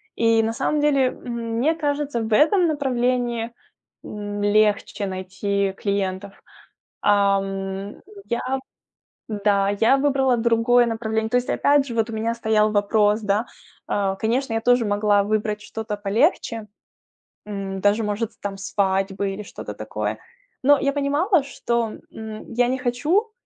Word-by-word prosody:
И 230 -1 +3
на 225 0 0
самом 295 +5 0
деле, 275 -3 +3
м, 235 -2 -5
мне 305 +7 +2
кажется, 290 -5 -1
в 220 0 -2
этом 325 - +4
направлении, 245 -5 0 0.5
м, 205 -1 -5
легче 205 0 +2
найти 190 +1 -2
клиентов. 200 -1 -3 0.6
Ам, 195 -1 0 0.3
я, 235 - -2 0.9
да, 200 -2 +1
я 230 +5 +5
выбрала 270 -3 +2
другое 235 +1 +3
направление. 220 -1 -2
То 245 - +2
есть 250 - -2
опять 285 -1 +3
же 235 - -5
вот 225 0 +1
у - - -5
меня 225 +1 -1
стоял 215 -2 +2
вопрос, 210 +1 +2
да. 205 +2 0 0.4
Э, 195 -1 0
конечно, 240 +2 0
я 225 - 0
тоже 245 0 +3
могла 205 0 +2
выбрать 210 0 -1
что-то 220 0 -5
полегче, 220 - 0 0.8
м, 195 -2 -5
даже 205 +3 +2
может 210 +2 -2
там 200 -1 -4
свадьбы 195 0 -1
или 200 +2 -6
что-то - - -8
такое. - - -4 0.4
Но 285 +2 +6
я 280 - +1
понимала, 290 +5 +2
что, 235 -4 -2 0.2
м, 220 0 -8
я 245 +1 +3
не 260 +1 0
хочу, 295 - 0
220 Hz, 140 wpm, -23 LUFS, 205-245 Hz, 0.9 s, Но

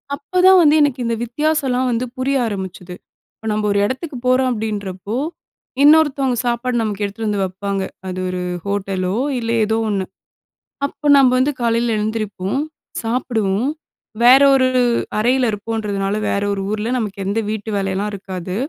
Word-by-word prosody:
அப்பதான் 365 +5 +4
வந்து 305 -2 +5
எனக்கு 280 -3 +2
இந்த 230 0 0
வித்தியாசம்லாம் 260 0 0
வந்து 235 +1 -1
புரிய 270 +2 0
ஆரம்பிச்சது. 190 -3 -6 0.4
இப்போ 225 - -9
நம்ம 210 0 -1
ஒரு 200 - +2
எடத்துக்கு 260 +4 -4
போறோம் 255 +1 +3
அப்படின்றப்போ, 210 -3 -4 0.7
இன்னொருத்தவங்க 285 -4 +4
சாப்பாடு 240 +1 -1
நமக்கு 210 -2 -2
எடுத்துட்டு 215 +2 -4
வந்து 205 -2 0
வப்பாங்க. 195 +1 -3 0.2
அது 185 0 -4
ஒரு 180 0 -3 0.2
ஹோட்டலோ 195 -2 -2 0.2
இல்ல 230 -1 -2
ஏதோ 220 +1 0
ஒண்ணு. 195 -2 -1 0.8
அப்ப 295 +1 -3
நம்ம 270 -2 +6
வந்து 270 +3 +2
காலையில 230 -1 +1
எழுந்திரிப்போம், 210 0 -2 0.4
சாப்பிடுவோம். 225 -1 0 0.5
வேற 255 +3 +8
ஒரு 260 -1 +3 0.5
அறையில 250 +3 +2
இருப்போன்றதுனால 205 -2 -2
வேற 200 - 0
ஒரு 195 - -3
ஊரில. 215 +2 -2
நமக்கு 200 -4 -3
எந்த 205 +3 0
வீட்டு 220 0 -4
வேலைலாம் 195 +1 -2
இருக்காது. 185 -2 -6
220 Hz, 140 wpm, -19 LUFS, 200-255 Hz, 0.8 s, வேற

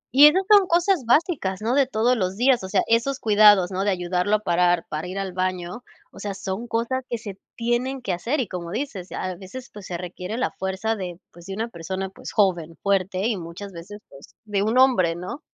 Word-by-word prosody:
Y 290 +2 +10
esas 370 +6 +3
son 405 -3 +6
cosas 345 - +2
básicas, 255 - +2
¿no? 235 +3 +1
de 275 -2 +3
todos 245 +1 +2
los 190 -2 -2
días, 250 -3 +3
o 190 - -5
sea, 190 -1 +2
esos 235 +4 +1
cuidados, 205 -4 +5
¿no?, 190 +1 -1
de 205 - +1
ayudarlo 180 +2 0
a - - +1
parar 175 -1 +2
para 155 +3 -4
ir 185 +2 -6
al 195 -2 -3
baño, 185 +4 -3 0.3
o - - -13
sea, 200 -2 -4
son 195 +5 -5
cosas 235 +3 -1
que 235 - -2
se 200 -3 -9 0.2
tienen 240 +3 -1
que 190 - -1
hacer 240 - -1
y, 245 - -1
como 175 -2 -6
dices, 205 -4 -4
a 185 0 -3
veces, 200 +8 -10
pues, 205 -2 -10
se 175 - -4
requiere 180 +4 -6
la 255 - 0
fuerza 190 +4 -2
de, 180 -3 -6
pues, 175 +1 -15
de 195 - -5
una 225 +2 -2
persona, 190 +1 -5
pues, - - -9
joven, 175 -6 +1
fuerte 195 -1 +1
y 220 -5 0
muchas 175 +4 -8
veces, 200 +5 -10
pues, 135 - -16
de 205 -2 -1
un 220 +4 +1
hombre, 210 -11 +4
¿no? 180 - -6
200 Hz, 225 wpm, -24 LUFS, 185-240 Hz, 0.3 s, Y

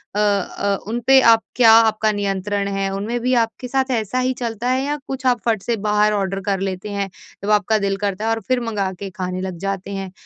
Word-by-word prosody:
अ - - 0
अ, 200 -1 0
उनपे 240 +4 +4
आप 225 -2 +5
क्या 230 -2 +6
आपका 220 -1 +4
नियंत्रण 200 0 -2
है? 195 0 -1
उनमें 210 +5 -2
भी 250 +2 +1
आपके 225 +2 -7
साथ 265 +1 0
ऐसा 220 +4 -2
ही 255 0 +1
चलता 230 +1 -2
है 260 +1 +1
या 290 +1 -1
कुछ 265 -1 -5
आप 245 -3 +2
फट 225 -4 +1
से 235 - 0
बाहर 210 0 +3
ऑर्डर 195 -1 -1
कर 195 -1 -1
लेते 190 +1 -4
हैं? 200 -1 -2 0.3
जब 200 - -2
आपका 210 +1 +3
दिल 200 -1 -1
करता 200 +1 -2
है - - +1
और 225 0 -1
फिर 255 -1 +2
मँगा 210 -5 -2
के 200 - -5
खाने 185 -1 -4
लग 185 -2 -5
जाते 195 0 -3
हैं? 195 -1 -5
210 Hz, 230 wpm, -20 LUFS, 195-230 Hz, 0.3 s, क्या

